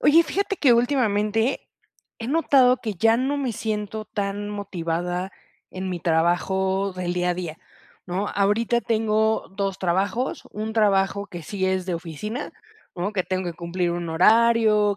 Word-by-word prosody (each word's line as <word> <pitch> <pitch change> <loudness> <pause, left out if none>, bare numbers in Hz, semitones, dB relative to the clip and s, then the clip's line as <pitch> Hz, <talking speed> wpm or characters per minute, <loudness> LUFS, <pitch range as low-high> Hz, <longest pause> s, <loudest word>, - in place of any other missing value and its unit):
Oye, 320 +3 +6
fíjate 400 +4 -2
que 270 -8 +5
últimamente 230 -2 +1 0.5
he 230 - -5
notado 270 -4 +4
que 220 -4 -4
ya 225 +5 +3
no 265 +4 0
me 270 -4 -1
siento 215 -1 -3
tan 205 0 -3
motivada 180 -2 -3 0.4
en 185 0 -5
mi 175 -1 -4
trabajo 190 +4 +1
del 180 -1 -3
día 180 0 +1
a - - 0
día, 170 -3 -5 0.5
¿no? 190 +3 -2
Ahorita 210 +4 +1
tengo 220 -1 +1
2 195 -1 -2
trabajos, 190 +7 -1
un 215 +1 -4
trabajo 200 -2 +2
que 175 -4 -8
sí 190 +3 -2
es 190 -1 0
de 180 - -1
oficina, 175 - -5 0.4
¿no? 185 +4 -2
Que 195 -3 0
tengo 185 +1 -2
que 165 - -12
cumplir 175 +1 -2
un 170 0 -3
horario, 215 +3 +4
200 Hz, 155 wpm, -24 LUFS, 180-225 Hz, 0.5 s, Oye